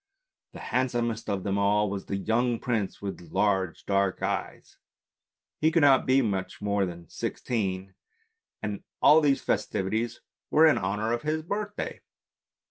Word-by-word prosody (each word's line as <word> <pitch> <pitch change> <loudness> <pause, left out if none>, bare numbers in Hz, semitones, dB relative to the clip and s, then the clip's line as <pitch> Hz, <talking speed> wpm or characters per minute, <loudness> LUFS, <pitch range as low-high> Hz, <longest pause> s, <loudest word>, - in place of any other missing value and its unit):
The - - -9
handsomest 120 -3 0
of 100 -2 -1
them 100 0 0
all 105 +1 +3
was 100 -1 -5
the 100 - -2
young 115 +4 +1
prince 110 -6 -2
with 100 -3 -5
large 95 -4 0
dark 100 -1 +1
eyes; - - -4 0.8
he 155 - +4
could 165 -2 +3
not 135 -2 +5
be 130 +1 +4
much 95 -4 -2
more 100 -1 0
than 85 -1 -9
sixteen, 95 -4 -3 0.7
and 105 -1 -4 0.2
all 155 +2 +7
these 140 -2 +2
festivities 110 +5 -1 0.3
were 155 +1 +6
in 155 - +5
honour 105 +4 -1
of 120 - -1
his 155 +1 -1
birthday. 205 +4 -4
105 Hz, 145 wpm, -27 LUFS, 100-130 Hz, 0.8 s, all